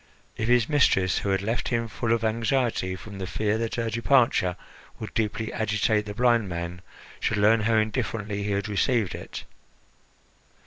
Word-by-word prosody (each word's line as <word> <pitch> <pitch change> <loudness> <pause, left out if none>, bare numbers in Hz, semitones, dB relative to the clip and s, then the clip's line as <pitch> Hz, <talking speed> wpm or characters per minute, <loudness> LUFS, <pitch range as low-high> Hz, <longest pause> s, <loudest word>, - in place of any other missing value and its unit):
If 110 - -2
his 120 -1 +4
mistress, 115 - +3
who 100 - -3
had 95 0 +1
left 115 +4 -1
him 115 -1 0
full 110 +1 -3
of 115 -1 +1
anxiety 115 -3 0
from 100 +1 -10
the 95 - -4
fear 105 +3 -1
that 115 -1 -2
her 115 -1 -1
departure 115 -6 +2 0.4
would 110 - -7
deeply 110 0 -2
agitate 105 0 0
the 105 - -6
blind 120 -4 +2
man, 85 +1 -5 0.4
should 110 - 0
learn 105 +2 +4
how 110 +1 +1
indifferently 110 -2 -1
he 100 - -3
had 100 0 -1
received 105 0 +1
it! - - -7
110 Hz, 170 wpm, -26 LUFS, 100-115 Hz, 0.4 s, his